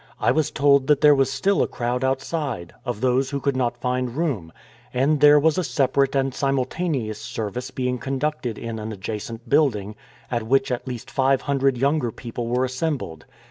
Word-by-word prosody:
I -, -, +3 dB
was 155 Hz, -2 st, +1 dB
told 140 Hz, -2 st, +3 dB
that 150 Hz, -2 st, +3 dB
there 150 Hz, 0 st, +7 dB
was 135 Hz, -1 st, +2 dB
still 190 Hz, +9 st, +1 dB
a -, -, +2 dB
crowd 125 Hz, +1 st, -2 dB
outside 130 Hz, -, -2 dB
— -, -, -35 dB
of 120 Hz, -4 st, -3 dB
those 130 Hz, +1 st, +2 dB
who 140 Hz, -1 st, -2 dB
could 140 Hz, 0 st, 0 dB
not 120 Hz, -2 st, 0 dB
find 125 Hz, 0 st, -2 dB
room: 125 Hz, -, -2 dB, 0.4 s
and 140 Hz, +4 st, +2 dB
there 150 Hz, +1 st, +7 dB
was 160 Hz, +4 st, +2 dB
a -, -, 0 dB
separate 140 Hz, -2 st, +1 dB
and 135 Hz, -1 st, +1 dB
simultaneous 135 Hz, -4 st, -1 dB
service 110 Hz, +2 st, -4 dB
being 125 Hz, -1 st, -2 dB
conducted 135 Hz, -3 st, -2 dB
in 115 Hz, -1 st, -5 dB
an 110 Hz, +1 st, -5 dB
adjacent 110 Hz, +3 st, -6 dB
building, 115 Hz, -7 st, +1 dB, 0.4 s
at 120 Hz, -1 st, 0 dB
which 135 Hz, +4 st, +1 dB
at 125 Hz, +1 st, -3 dB
least 125 Hz, -3 st, -6 dB
five 135 Hz, 0 st, +2 dB
hundred 135 Hz, -2 st, +1 dB
younger 140 Hz, 0 st, +1 dB
people 115 Hz, +1 st, -6 dB
were 125 Hz, +2 st, +1 dB
assembled. 130 Hz, -, -3 dB
130 Hz, 185 wpm, -23 LUFS, 120-140 Hz, 0.4 s, there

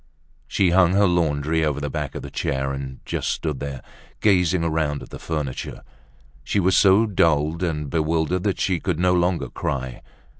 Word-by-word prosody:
She 95 Hz, -3 st, +2 dB
hung 90 Hz, -1 st, +4 dB
her 100 Hz, +1 st, +4 dB
laundry 80 Hz, -3 st, +1 dB
over 75 Hz, -2 st, 0 dB
the 70 Hz, -, -3 dB
back -, -, -4 dB
of -, -, -6 dB
a -, -, -8 dB
chair 70 Hz, 0 st, -2 dB
and 70 Hz, -1 st, -6 dB
just -, -, -2 dB
stood 75 Hz, -5 st, -2 dB
there, 70 Hz, -2 st, -6 dB, 0.4 s
gazing 90 Hz, -4 st, +3 dB
around 80 Hz, -3 st, -1 dB
at -, -, -13 dB
the -, -, -8 dB
furniture. 75 Hz, -5 st, -4 dB, 0.6 s
She 100 Hz, -, 0 dB
was 95 Hz, 0 st, +3 dB
so 100 Hz, +3 st, +5 dB
dulled 80 Hz, -5 st, +1 dB
and 75 Hz, -4 st, -2 dB
bewildered 80 Hz, +3 st, 0 dB
that 100 Hz, 0 st, -1 dB
she 90 Hz, -3 st, +1 dB
could 90 Hz, -2 st, -2 dB
no 90 Hz, +1 st, +3 dB
longer 90 Hz, 0 st, +1 dB
cry. 65 Hz, -3 st, -4 dB
80 Hz, 180 wpm, -23 LUFS, 75-90 Hz, 0.6 s, so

